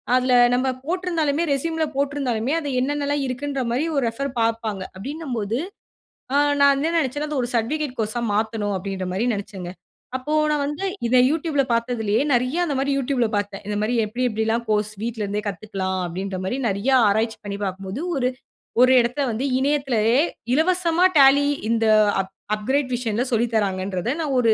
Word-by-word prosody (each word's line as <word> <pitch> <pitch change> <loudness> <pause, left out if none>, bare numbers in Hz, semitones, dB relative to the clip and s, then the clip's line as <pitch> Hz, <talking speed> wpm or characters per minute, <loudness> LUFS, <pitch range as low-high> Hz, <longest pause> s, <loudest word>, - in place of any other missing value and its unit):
அதில 255 0 +2 0.2
நம்ப 260 +1 0 0.2
போட்டிருந்தாலுமே 335 -3 0
ரெஸ்யூமில 320 +3 0
போட்டிருந்தாலுமே, 275 -3 -1
அது 290 - -4
என்னென்னலாம் 290 +1 -1
இருக்குன்ற 275 +2 -3
மாரி 280 +6 0
ஒரு 270 - +2
ரெஃபர் 275 +4 -4
பார்ப்பாங்க. 225 -3 -1
அப்படீன்னும் 275 +5 -5
போது, 215 +5 -2 0.8
ஆ - - +4 0.3
நான் 280 0 +6
என்ன 320 +3 0
நெனைச்சேன்னா, 290 +1 -1
"அதை 290 - -1
ஒரு - - -3
சர்டிபிகேட் 275 +4 -1
கோர்ஸா 220 +2 -1
மாத்தணும்." 215 -2 -1
அப்படீன்ற 190 -1 -4
மாரி 215 +6 0
நெனைச்சேங்க. 195 -3 -6 0.5
அப்போ 260 +4 -5 0.2
நான் 295 -1 +1
வந்து 295 +7 -3 0.2
இதை 250 +2 +4
YouTubeல 310 -3 +1
பார்த்ததிலேயே 230 -2 0
நெறைய 255 +7 +1
அந்த 295 -4 -2
மாரி 275 +1 0
YouTubeல 255 -3 +1
பார்த்தேன். 205 -1 -2
இத 210 - -2
மாரி, 220 +3 0
"எப்படி, 230 +4 -4
எப்படில்லாம் 220 +1 0
கோர்ஸ் 210 0 +1
வீட்லருந்தே 210 -3 -2
கத்துக்கலாம்?" 190 -1 -3
அப்படீன்ற 190 +2 -4
மாரி 220 +7 -1
நெறைய 200 +7 0 0.2
ஆராய்ச்சி 220 +2 0
பண்ணி 200 0 -4
பார்க்கும்போது, 195 - -4
ஒரு 250 -2 +1 0.5
ஒரு 255 - +6
இடத்த 245 +4 -2
வந்து 230 +5 -3 0.2
இணையத்திலயே 265 -5 +2 0.4
இலவசமா 345 +3 +3
டாலி 280 +1 +6 0.2
இந்த 230 -1 +2 0.3
அப் 190 0 -3 0.2
அப்கிரேட் 260 +5 -1
வர்ஷன்ல 235 -1 -1
சொல்லி 235 +1 +2
தர்றாங்கன்றத 190 0 -1
நான் 285 -4 -1
ஒரு 230 -2 +4
245 Hz, 160 wpm, -22 LUFS, 210-285 Hz, 0.8 s, நான்